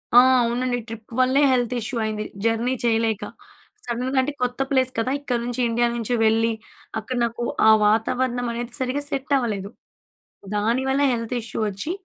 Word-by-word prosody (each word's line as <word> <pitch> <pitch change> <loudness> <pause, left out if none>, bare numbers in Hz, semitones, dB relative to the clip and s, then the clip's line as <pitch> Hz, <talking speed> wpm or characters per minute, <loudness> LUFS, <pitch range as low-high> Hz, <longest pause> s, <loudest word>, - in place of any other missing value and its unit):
ఆ! - - +11 0.2
అవునండి 245 +1 0
ట్రిప్ 225 0 -10
వల్లే 260 +3 +4
హెల్త్ 245 -1 +1
ఇష్యూ 235 +2 -4
అయింది. 215 -1 -2 0.2
జర్నీ 230 +3 +1
చేయలేక. 225 -2 +1 0.6
సడన్‌గా 250 +3 -2
అంటే 290 +3 -2
కొత్త 250 +1 -2
ప్లేస్ 260 -2 +2
కదా! 255 +3 0
ఇక్కడ 250 -4 -1
నుంచి, 245 +1 -4
ఇండియా 240 +1 +2
నుంచి 235 +1 -2
వెళ్ళి 225 +1 +3 0.5
అక్కడ 245 +3 -4
నాకు 235 +1 -4 0.2
ఆ - - +9 0.2
వాతావరణం 245 +3 +1
అనేది 240 0 -5
సరిగ్గా 260 +3 -1
సెట్ 275 0 -4
అవ్వలేదు. 205 -6 -2 0.9
దాని 230 +5 +1
వల్ల 275 +2 +2
హెల్త్ 230 +1 -3
ఇష్యూ 225 0 -6
వచ్చి, 205 - -4
240 Hz, 160 wpm, -23 LUFS, 225-255 Hz, 0.9 s, ఆ